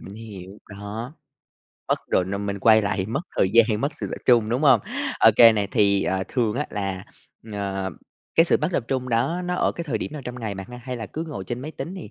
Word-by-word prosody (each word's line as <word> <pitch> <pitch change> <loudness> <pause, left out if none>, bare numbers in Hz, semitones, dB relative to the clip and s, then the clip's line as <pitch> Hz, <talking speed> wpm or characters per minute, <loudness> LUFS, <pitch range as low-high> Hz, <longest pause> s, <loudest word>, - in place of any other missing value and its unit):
mình 95 - -10
hiểu. 105 -4 -9 0.2
Đó, 105 +6 -7 0.7
mất - - +2
rồi, 90 - +3
nên 100 +2 -4
mình 100 0 -3
quay 110 +2 +5
lại 105 +1 -1
thì 95 - -1
mất 120 +7 -2 0.2
thời 95 - +3
gian, 110 -1 +4
mất 140 +4 -1
sự - - -2
tập - - -5
trung, 120 -3 +5
đúng 125 +6 0
hông? 140 - +6 0.4
OK 115 -1 +6 0.2
này, 100 -2 0
thì, 100 -1 +3
ờ, 95 0 -1
thường 115 -4 0
á, 145 +4 -2
là, 95 -2 -3 0.5
ờ, 95 -1 -3 0.4
cái 165 - +6
sự - - +3
mất 150 - +1
tập 125 - 0
trung 130 -1 -1
đó 125 +10 0
nó 180 0 -1
ở - - +1
cái 170 - -6
thời 125 -8 -2
điểm 150 - -5
nào 150 - -7
trong 125 0 -6
ngày 110 -3 -3
bạn 95 -1 -7
ha? 125 - -8
Hay 125 -1 -4
là 110 -3 -5
cứ 160 - -5
ngồi 100 -11 -6
trên 120 +6 -5
máy 145 +4 -6
tính 170 +3 -6
thì 185 - -9
110 Hz, 255 wpm, -24 LUFS, 100-130 Hz, 0.7 s, hông